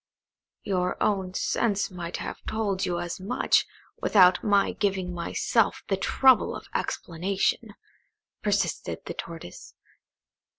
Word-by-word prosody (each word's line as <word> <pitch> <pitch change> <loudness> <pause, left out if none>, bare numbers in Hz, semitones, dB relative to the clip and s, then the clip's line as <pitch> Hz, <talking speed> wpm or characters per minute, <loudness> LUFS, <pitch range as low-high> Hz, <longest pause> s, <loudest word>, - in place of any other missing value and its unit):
"Your 180 -3 -1
own 190 -3 0
sense 205 -4 0
might 175 -1 -5
have - - -6
told 205 -4 -1
you 175 -1 -1
as 175 +1 -4
much, 200 +7 +2 0.3
without 185 -3 +5
my 200 -2 +3
giving 190 -3 -1
myself 195 +5 0
the 195 - +3
trouble 260 +6 +3
of - - -8
explanation," 185 +3 -1 0.7
persisted - - -1
the - - -5
Tortoise. 165 - -9
190 Hz, 115 wpm, -26 LUFS, 180-205 Hz, 0.7 s, without